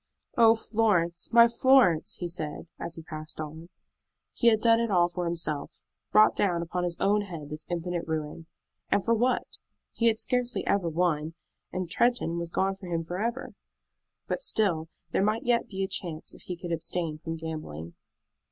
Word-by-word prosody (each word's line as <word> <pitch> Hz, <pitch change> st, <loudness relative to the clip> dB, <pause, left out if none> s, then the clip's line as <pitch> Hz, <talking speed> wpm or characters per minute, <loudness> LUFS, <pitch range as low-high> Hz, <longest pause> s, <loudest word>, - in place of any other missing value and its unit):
"Oh, 230 Hz, -1 st, +6 dB
Florence, 205 Hz, -7 st, 0 dB
my 235 Hz, 0 st, +8 dB
Florence!" 235 Hz, -8 st, +4 dB
he 175 Hz, -, -4 dB
said, 160 Hz, -3 st, -4 dB
as 170 Hz, -, -5 dB
he 165 Hz, -, -9 dB
passed 155 Hz, -1 st, -8 dB
on. 160 Hz, +2 st, -7 dB, 0.6 s
He 235 Hz, -, +1 dB
had 220 Hz, -2 st, +6 dB
done 230 Hz, 0 st, +4 dB
it 230 Hz, -1 st, 0 dB
all 175 Hz, -3 st, +4 dB
for 175 Hz, 0 st, -4 dB
himself, 165 Hz, -3 st, -3 dB, 0.3 s
brought 215 Hz, 0 st, +6 dB
down 175 Hz, -4 st, +1 dB
upon 180 Hz, +1 st, -3 dB
his 170 Hz, -1 st, -3 dB
own 205 Hz, +1 st, +3 dB
head 165 Hz, -7 st, -7 dB
this 150 Hz, 0 st, -7 dB
infinite 175 Hz, 0 st, -3 dB
ruin, 160 Hz, +1 st, -4 dB, 0.4 s
and 200 Hz, -, +2 dB
for 230 Hz, -, +3 dB
what? 245 Hz, +3 st, 0 dB, 0.3 s
He 230 Hz, -, +2 dB
had 220 Hz, -1 st, +3 dB
scarcely 250 Hz, 0 st, -1 dB
ever 190 Hz, -4 st, +1 dB
won, 160 Hz, -1 st, 0 dB, 0.4 s
and 185 Hz, -1 st, -3 dB
Tretton 170 Hz, -3 st, +1 dB
was 170 Hz, -1 st, -4 dB
gone 195 Hz, +3 st, +1 dB
from 190 Hz, -2 st, -10 dB
him 165 Hz, -1 st, -1 dB
forever. 215 Hz, +9 st, -3 dB, 0.7 s
But -, -, -2 dB
still 180 Hz, -, +1 dB, 0.2 s
there -, -, +1 dB
might 215 Hz, +2 st, +1 dB
yet 240 Hz, -1 st, +2 dB
be 195 Hz, -1 st, -3 dB
a -, -, 0 dB
chance 165 Hz, -4 st, -3 dB
if -, -, -15 dB
he 180 Hz, -, -5 dB
could 175 Hz, 0 st, -6 dB
abstain 165 Hz, -1 st, -2 dB
from 165 Hz, 0 st, -4 dB
gambling. 155 Hz, -, -6 dB
175 Hz, 180 wpm, -28 LUFS, 165-220 Hz, 0.7 s, my